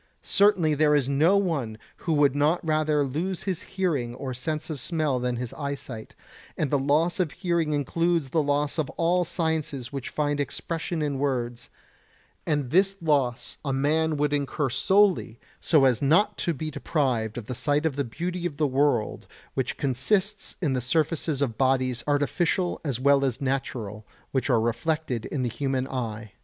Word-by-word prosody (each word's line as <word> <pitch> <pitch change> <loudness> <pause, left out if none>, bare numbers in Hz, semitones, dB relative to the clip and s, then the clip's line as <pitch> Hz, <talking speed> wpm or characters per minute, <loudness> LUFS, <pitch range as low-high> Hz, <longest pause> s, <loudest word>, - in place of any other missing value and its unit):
Certainly 190 -6 +3
there 150 0 +3
is 140 -3 +2
no 155 +8 +4
one 145 - -1 0.2
who 165 - -1
would 145 -3 +4
not 150 +4 +2
rather 155 -2 +2
lose 165 +7 -3
his 185 -5 -2 0.2
hearing 140 -11 0
or 130 +1 -5
his 125 - -5
sense 155 +3 -3
of 150 - -4
smell 150 -2 0
than 125 0 -1
his 120 -1 -5
eyesight, 140 -6 -6 0.4
and 150 - -1
the 145 - +3
loss 155 +7 +1
of 175 -5 0
hearing 170 -3 0
includes 165 +1 0
the 160 - +3
loss 145 +1 0
of 155 - 0
all 175 +2 +2
sciences 160 -6 -2
which 135 -3 -4
find 145 -1 -1
expression 160 +3 -2
in 140 -2 -1
words; 125 -3 -2 0.8
and 145 -5 0
this 195 +3 +3
loss 140 -7 0
a 140 - -1
man 155 +3 +1
would 145 0 +1
incur 140 -1 -1
solely 190 - +2 0.2
so 150 -5 +4
as 125 -4 +3
not 195 +9 +3
to 170 - -1
be 155 0 -4
deprived 125 -8 -1
of 120 - -5
the 125 - -4
sight 145 +5 0
of 155 -4 0
the 140 - 0
beauty 175 +8 -3
of 145 -4 -9
the 155 - +2
world 140 -4 +1 0.3
which 130 -2 -2
consists 190 - 0
in 145 -5 +2
the 130 - 0
surfaces 150 +1 0
of 115 -5 -3
bodies 130 -2 +1
artificial 165 +5 +1
as 135 -6 -2
well 140 +1 +4
as 130 -2 0
natural, 120 -6 -3 0.2
which 130 +1 0
are 120 -3 +4
reflected 120 +2 -1
in 135 -3 -2
the - - +1
human 135 +1 -1
eye. 115 -5 -4
145 Hz, 175 wpm, -26 LUFS, 130-160 Hz, 0.8 s, no